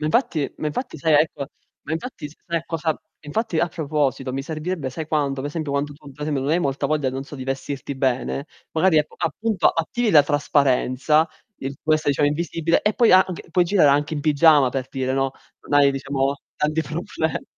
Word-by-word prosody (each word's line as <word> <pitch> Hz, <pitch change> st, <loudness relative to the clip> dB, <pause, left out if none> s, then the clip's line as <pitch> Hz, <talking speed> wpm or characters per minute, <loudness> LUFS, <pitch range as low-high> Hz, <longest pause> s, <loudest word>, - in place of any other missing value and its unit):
Ma 155 Hz, -, -1 dB
infatti 155 Hz, -, +1 dB
ma -, -, -2 dB
infatti 160 Hz, -, -4 dB
sai 160 Hz, +2 st, +1 dB
ecco 145 Hz, -2 st, +2 dB, 0.4 s
ma -, -, -6 dB
infatti 165 Hz, -, -5 dB
s 150 Hz, -, -17 dB
sai 170 Hz, -2 st, -1 dB
cosa 160 Hz, -1 st, -1 dB, 0.3 s
infatti 165 Hz, +3 st, -2 dB
a 170 Hz, -, +1 dB
proposito, 145 Hz, -5 st, -1 dB
mi 135 Hz, +1 st, -2 dB
servirebbe 155 Hz, -1 st, -4 dB
sai 155 Hz, +4 st, -5 dB
quando? 145 Hz, -3 st, 0 dB
Ad 140 Hz, -, -3 dB
esempio 155 Hz, 0 st, -4 dB
quando 140 Hz, +1 st, -1 dB
tu, 145 Hz, -1 st, -14 dB
per 150 Hz, +2 st, -10 dB
esempio, 145 Hz, -3 st, -1 dB
non 140 Hz, -, -1 dB
hai 165 Hz, -, +3 dB
molta 140 Hz, -3 st, -1 dB
voglia, 150 Hz, -3 st, 0 dB
non 135 Hz, +1 st, -4 dB
so, 145 Hz, -, -10 dB
di 130 Hz, -, -6 dB
vestirti 135 Hz, +1 st, -4 dB
bene, 130 Hz, +2 st, -1 dB, 0.3 s
magari 160 Hz, 0 st, +4 dB
appu 150 Hz, -, -1 dB
appunto 215 Hz, +6 st, +1 dB
attivi 215 Hz, +8 st, 0 dB
la 150 Hz, -4 st, +7 dB
trasparenza, 145 Hz, +1 st, +2 dB, 0.3 s
in 135 Hz, +1 st, -4 dB
questa 155 Hz, -1 st, +1 dB
diciamo 145 Hz, +1 st, +3 dB
invisibile, 165 Hz, +2 st, 0 dB
e 210 Hz, 0 st, +1 dB
poi 235 Hz, -5 st, +4 dB
anc 185 Hz, -2 st, +3 dB
puoi 180 Hz, +2 st, +3 dB
girare 175 Hz, -4 st, +4 dB
anche 145 Hz, +3 st, +1 dB
in 150 Hz, -, -2 dB
pigiama 150 Hz, -2 st, +5 dB
per 130 Hz, -1 st, -3 dB
dire, 130 Hz, -1 st, -2 dB
no? 135 Hz, 0 st, +1 dB, 0.4 s
Non 145 Hz, -, +4 dB
hai 140 Hz, -, +5 dB
diciamo, 135 Hz, 0 st, -1 dB, 0.2 s
tanti 155 Hz, +2 st, 0 dB
proble 160 Hz, 0 st, -3 dB
150 Hz, 200 wpm, -22 LUFS, 140-160 Hz, 0.4 s, la